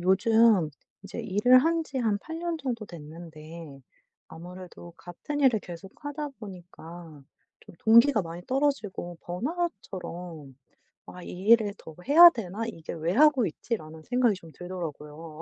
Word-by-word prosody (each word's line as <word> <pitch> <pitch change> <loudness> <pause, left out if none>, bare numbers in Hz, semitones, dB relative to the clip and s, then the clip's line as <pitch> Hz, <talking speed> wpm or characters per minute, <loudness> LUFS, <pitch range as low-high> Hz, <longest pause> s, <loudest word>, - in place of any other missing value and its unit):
요즘 195 -1 +4 0.3
이제 200 +4 -7
일을 225 +4 +4
한지 320 -1 0
한 220 -4 +1
8 325 +6 -7
년 340 0 -2
정도 240 -7 -4
됐는데 160 -2 -11 0.5
아무래도 175 0 -11
같은 235 +12 -6
일을 255 -5 +4
계속 175 +2 -10
하다 290 +1 -4
보니까 175 -6 -11 0.4
좀 - - -16
동기가 230 +1 +5
많이 170 +1 -8
떨어지고 255 - -2
번아웃처럼 180 - -5 0.5
'아 180 - -11
이 185 +4 -7
일을 220 -3 +5
더 160 - -12
해야 335 +5 +10
되나? 210 - -6
이게 165 -8 -7
왜 165 +1 -2
하고 290 -2 +5
있지?'라는 160 -3 -5
생각이 245 -1 +2
좀 165 -3 -14
들더라구요. 160 -3 -8
190 Hz, 280 characters per minute, -27 LUFS, 170-245 Hz, 0.5 s, 해야